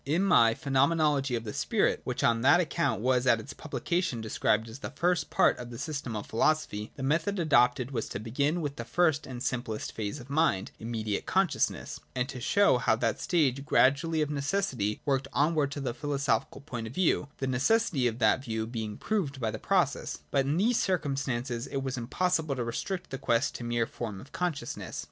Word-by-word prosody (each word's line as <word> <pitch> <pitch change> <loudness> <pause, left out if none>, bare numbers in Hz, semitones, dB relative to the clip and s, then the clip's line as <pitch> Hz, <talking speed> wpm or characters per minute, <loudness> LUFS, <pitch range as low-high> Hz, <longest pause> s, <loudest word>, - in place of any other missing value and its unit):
In 160 +7 +1
my 115 -13 +5
Phenomenology 140 -1 +2
of 115 - -3
the 105 - -6
Spirit, - - +1
which - - -2
on 115 -1 +3
that 145 +8 +6
account 170 -8 0
was 125 +1 +2
at 115 -2 +5
its 110 - -8
publication 170 -3 -2
described 110 0 0
as 115 +4 -9
the - - -5
first 175 0 0
part - - +4
of 120 - -7
the 120 - -8
System 140 -5 -4
of 105 - -4
Philosophy, 115 -4 0
the 135 - -6
method 165 +8 +1
adopted 125 -6 +3
was 115 -4 -3
to - - -4
begin 140 +10 0
with 145 -2 -4
the 120 - -4
first 155 +3 +1
and 125 -1 -6
simplest 120 -4 -3
phase 110 +6 -4
of 125 - -11
mind, 140 -10 +1
im 115 - -6
mediate 110 -3 -2
consciousness, - - 0 0.2
and 125 0 0
to 130 -3 -6
show 200 -3 +4
how 115 - +3
that 115 - -1
stage 140 -6 +1
gradually 150 +4 +3
of 150 - -3
necessity 140 - -1
worked 135 -1 +1
onward 150 -1 +2
to 145 - -5
the 130 -4 -2
philoso 140 -3 0
phical 140 - -14
point 120 -6 -5
of 115 - -10
view, 175 -5 +2
the 135 - -2
necessity 135 - +2
of 115 -1 -2
that 120 +2 +3
view 110 -3 -2
being 110 -2 -5
proved 165 -11 -2
by 115 -3 -1
the - - -6
process. - - 0
But 135 -1 +2
in 145 +3 +1
these 225 +5 +3
circumstances 135 -8 -1
it 135 -1 -3
was 135 -1 -2
impossible 155 +4 0
to 125 - -2
restrict 180 - -4
the 135 - -4
quest 115 0 +1
to - - -7
the 120 - -4
mere 120 -1 +1
form 110 -4 -6
of 135 - -13
consciousness. 160 -9 -3
135 Hz, 205 wpm, -29 LUFS, 120-155 Hz, 0.2 s, that